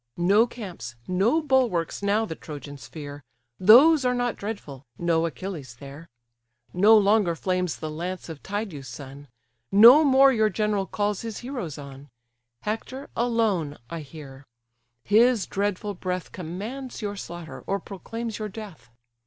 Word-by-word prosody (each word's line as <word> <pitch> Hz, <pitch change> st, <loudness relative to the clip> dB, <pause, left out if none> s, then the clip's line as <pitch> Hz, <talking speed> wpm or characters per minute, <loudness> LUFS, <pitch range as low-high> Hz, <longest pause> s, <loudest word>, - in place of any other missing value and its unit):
No 200 Hz, +7 st, +4 dB
camps, 180 Hz, -, -8 dB
no 220 Hz, -, +2 dB
bulwarks 250 Hz, -, +1 dB
now 205 Hz, +2 st, +1 dB
the 185 Hz, -, -5 dB
Trojans 145 Hz, -5 st, -9 dB
fear, 145 Hz, +2 st, -9 dB, 0.4 s
Those 265 Hz, -, +7 dB
are 250 Hz, 0 st, +1 dB
not 245 Hz, -1 st, -1 dB
dreadful, 195 Hz, -, -7 dB
no 170 Hz, -1 st, +1 dB
Achilles 160 Hz, -7 st, -7 dB
there; 140 Hz, +4 st, -11 dB, 0.6 s
No 210 Hz, +5 st, +6 dB
longer 205 Hz, -4 st, +3 dB
flames 180 Hz, -1 st, -1 dB
the 155 Hz, -1 st, -5 dB
lance 180 Hz, +4 st, -5 dB
of 160 Hz, -4 st, -8 dB
Tydeus' 195 Hz, -9 st, -5 dB
son; 140 Hz, +3 st, -10 dB, 0.4 s
No 235 Hz, +10 st, +9 dB
more 270 Hz, -1 st, +6 dB
your 220 Hz, -2 st, +3 dB
general 210 Hz, -1 st, -1 dB
calls 205 Hz, -1 st, -1 dB
his 225 Hz, -3 st, -6 dB
heroes 240 Hz, -, -5 dB
on: 140 Hz, 0 st, -11 dB, 0.5 s
Hector, 225 Hz, +6 st, -5 dB
alone, 220 Hz, -11 st, 0 dB
I 165 Hz, -, -4 dB
hear; 140 Hz, -2 st, -11 dB, 0.6 s
his 225 Hz, -1 st, +4 dB
dreadful 205 Hz, +1 st, -2 dB
breath 180 Hz, -1 st, -4 dB
Commands 215 Hz, +10 st, -6 dB
your 205 Hz, -1 st, -3 dB
slaughter, 170 Hz, -7 st, -8 dB
or 195 Hz, +1 st, 0 dB
proclaims 225 Hz, +3 st, -6 dB
your 215 Hz, -1 st, -4 dB
death. 200 Hz, -, -10 dB
195 Hz, 140 wpm, -25 LUFS, 160-225 Hz, 0.6 s, No